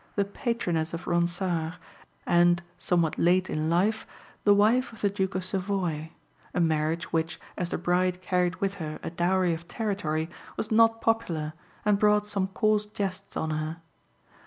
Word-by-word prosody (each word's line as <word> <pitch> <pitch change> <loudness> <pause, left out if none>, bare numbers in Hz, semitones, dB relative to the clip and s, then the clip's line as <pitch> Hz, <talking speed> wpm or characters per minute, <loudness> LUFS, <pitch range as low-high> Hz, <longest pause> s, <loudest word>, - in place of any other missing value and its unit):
the 200 - +2
patroness 180 -7 -1
of 170 - -7
Ronsard, 170 -1 0 0.5
and, 175 +1 +4 0.2
somewhat 170 -3 +1
late 180 +2 +3
in 155 +1 0
life, 200 +6 +1 0.4
the 205 - +7
wife 225 +5 +3
of 225 - -13
the 205 - +2
Duke 190 -1 -1
of 185 - -1
Savoy 185 -5 -1 0.5
a - - +2
marriage 160 0 0
which, 160 0 0 0.2
as 175 -2 -2
the - - -1
bride 180 +1 +1
carried 180 -1 +1
with 195 +1 -1
her 155 -1 -4
a - - -4
dowry 175 +1 +2
of 165 +1 -7
territory, 185 -9 -1 0.3
was 220 - -3
not 225 0 +5
popular, 170 -10 0 0.3
and 205 -1 +3
brought 210 0 +4
some 200 -2 -1
coarse 210 +2 +1
jests 200 -2 -4
on 160 - -1
her. 155 +1 -2
180 Hz, 160 wpm, -27 LUFS, 165-205 Hz, 0.5 s, the